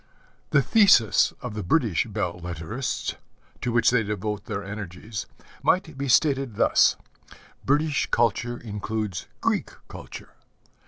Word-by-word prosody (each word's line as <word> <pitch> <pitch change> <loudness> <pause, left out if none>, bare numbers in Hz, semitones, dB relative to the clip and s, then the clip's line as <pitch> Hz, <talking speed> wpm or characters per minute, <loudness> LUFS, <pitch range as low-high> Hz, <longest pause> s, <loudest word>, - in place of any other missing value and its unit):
The 140 - +4
thesis 190 - +5
of 125 -4 -5
the 105 - -4
British 110 - +1
belle 100 -5 -3
lettrists, 90 - -4 0.4
to 125 - -1
which 120 0 +4
they 125 -2 +3
devote 105 0 -3
their 100 -1 -4
energies, 105 +1 -6 0.3
might 185 -6 +1
be 140 +1 -3
stated 135 -3 +2
thus: - - +4 0.7
British 150 +1 +1
culture 120 +1 +1
includes 105 -4 -4
Greek - - 0 0.2
culture. - - -10
110 Hz, 120 wpm, -25 LUFS, 100-130 Hz, 0.7 s, thesis